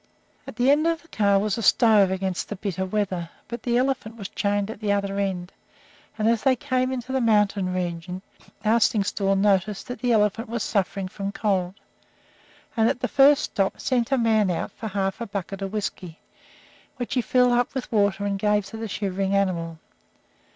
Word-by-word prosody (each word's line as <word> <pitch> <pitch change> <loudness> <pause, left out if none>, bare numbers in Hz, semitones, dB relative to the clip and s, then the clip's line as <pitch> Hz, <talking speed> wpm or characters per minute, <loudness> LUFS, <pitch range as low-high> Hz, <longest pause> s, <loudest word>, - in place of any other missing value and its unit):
At 230 - -10
one 245 - +3
end 295 +4 +4
of 335 0 -1
the - - -21
car 200 -2 +2
was 210 +2 0
a - - -2
stove 215 -2 +5
against 190 -1 -2
the 210 - -4
bitter 190 -1 -3
weather, 185 -4 -2 0.2
but 235 -1 -6
the 240 0 +1
elephant 250 -3 -1
was 200 -3 -6
chained 205 +1 -1
at 215 - -10
the 210 -2 -1
other 200 0 -1
end, 185 -2 -3 0.6
and 215 0 +1
as 230 -1 +2
they 265 -1 +3
came 255 +1 -1
into 255 0 -4
the 265 0 +1
mountain 210 -4 +2
region 180 0 -4 0.4
Arstingstall 210 -3 +2
noticed 195 0 +1
that 245 - -6
the 245 -1 0
elephant 215 +1 +1
was 235 -1 -2
suffering 195 -2 -1
from 195 +1 -5
cold, 190 -4 -1 1.0
and 225 -1 +3
at - - -2
the - - 0
first 280 +1 +5
stop 195 -2 -1
sent 245 -1 0
a 270 - +3
man 220 -4 +3
out 175 - -2
for 220 - -7
half 195 +1 -2
a 235 - -3
bucket 195 0 -5
of 195 -1 -3
whisky, 190 -5 -4 0.8
which 245 - -4
he 250 - +2
filled 250 +1 +3
up 245 +2 0
with 265 - -4
water 200 -2 +1
and 200 -1 -1
gave 210 0 +2
to 195 +3 -9
the 225 0 -4
shivering 195 -1 -1
animal. 170 -4 -1
205 Hz, 195 wpm, -24 LUFS, 195-235 Hz, 1.0 s, stove